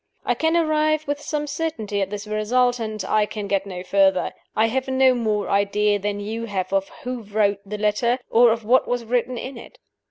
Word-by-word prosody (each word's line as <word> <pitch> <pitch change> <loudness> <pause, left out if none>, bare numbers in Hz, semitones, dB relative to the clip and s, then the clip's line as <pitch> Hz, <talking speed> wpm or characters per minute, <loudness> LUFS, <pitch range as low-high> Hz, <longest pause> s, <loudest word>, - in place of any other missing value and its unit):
I - - +2
can 320 +1 +1
arrive 310 -1 +1
with 290 0 -2
some 295 0 -2
certainty 280 -10 -3
at 195 - -1
this 205 +1 -5
result, 240 +4 +1
and 215 -3 -4
I 210 +1 +2
can 210 -1 -5
get 200 0 0
no 180 -2 -6
further. 190 0 +2 0.2
I 220 - +4
have 260 +4 -1
no 260 0 +4
more 215 -4 -1
idea 205 +1 +2
than 205 +1 -2
you 220 +3 -4
have 190 -3 -3
of 195 0 +1
who 250 -1 -4
wrote 205 -1 0
the 210 +1 -6
letter, 215 +4 +1
or 235 0 +6
of 225 -1 -2
what 250 +4 +3
was 245 -1 -2
written 245 +1 0
in 260 +1 -6
it. - - -14
220 Hz, 210 wpm, -23 LUFS, 205-255 Hz, 0.2 s, or